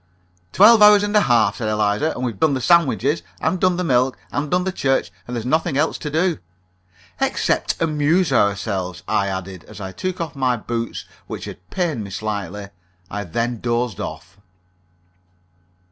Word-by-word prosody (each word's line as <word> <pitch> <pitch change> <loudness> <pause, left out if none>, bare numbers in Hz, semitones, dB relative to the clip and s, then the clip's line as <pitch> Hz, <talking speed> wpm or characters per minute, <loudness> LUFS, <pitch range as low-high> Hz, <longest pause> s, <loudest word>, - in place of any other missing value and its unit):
"Twelve 215 - +7
hours 210 -1 +8
and 205 +1 -1
a 210 - +6
half," 120 - +3
said 110 -2 -2
Eliza. 105 +7 +1
"And 125 - -5
we've 115 -6 -3
done 155 -3 +3
the - - -1
sandwiches, 145 -2 +2 0.2
and 170 +3 0
done 185 -1 +2
the 180 - -1
milk, 130 -4 +2
and 145 +1 -2
done 180 0 +1
the 190 - -1
church, 135 -6 0 0.2
and 125 - -5
there's 115 -1 -4
nothing 160 +2 0
else 155 +2 0
to 150 - -4
do." 165 +2 0 0.8
"Except - - 0
amuse 155 +1 +1
ourselves," 100 -5 0
I 105 -2 +1
added, 95 -2 -5
as 105 -1 -12
I 95 -2 -6
took 185 - -4
off 165 -2 -4
my 130 -3 +1
boots, 115 +1 -4 0.2
which - - -6
had 90 - -11
pained 165 - -2
me 100 - -8
slightly. 100 -1 -4 0.4
I 105 0 -4
then 115 +7 -2
dozed 120 -3 -1
off. 95 +2 -7
125 Hz, 175 wpm, -21 LUFS, 105-160 Hz, 0.8 s, hours